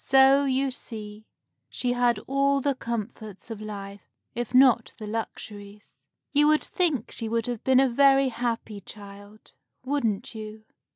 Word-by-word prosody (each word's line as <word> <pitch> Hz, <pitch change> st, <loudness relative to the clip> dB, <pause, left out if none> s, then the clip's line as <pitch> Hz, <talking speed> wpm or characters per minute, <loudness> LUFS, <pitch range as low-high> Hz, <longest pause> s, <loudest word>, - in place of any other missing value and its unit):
So, 270 Hz, +1 st, +5 dB
you 270 Hz, 0 st, +1 dB
see, 215 Hz, -4 st, -8 dB, 0.4 s
she 245 Hz, -1 st, -1 dB
had 245 Hz, -1 st, +2 dB
all 275 Hz, +1 st, +2 dB
the 280 Hz, +1 st, +1 dB
comforts 225 Hz, -3 st, -6 dB
of 215 Hz, -2 st, -6 dB
life, 200 Hz, -2 st, -8 dB, 0.2 s
if 240 Hz, -1 st, -4 dB
not 255 Hz, -2 st, +4 dB
the 215 Hz, -, -7 dB
luxuries. 210 Hz, -1 st, -7 dB, 0.3 s
You 295 Hz, +1 st, +5 dB
would 305 Hz, 0 st, +3 dB
think 315 Hz, -, 0 dB
she 225 Hz, -, -4 dB
would 230 Hz, 0 st, 0 dB
have 240 Hz, -3 st, -4 dB
been 260 Hz, -1 st, +4 dB
a 270 Hz, -, +5 dB
very 270 Hz, +1 st, +4 dB
happy 230 Hz, -3 st, -3 dB
child, 205 Hz, +2 st, -12 dB, 0.3 s
wouldn't 240 Hz, -8 st, -1 dB
you? 215 Hz, 0 st, -9 dB
235 Hz, 150 wpm, -26 LUFS, 215-270 Hz, 0.4 s, So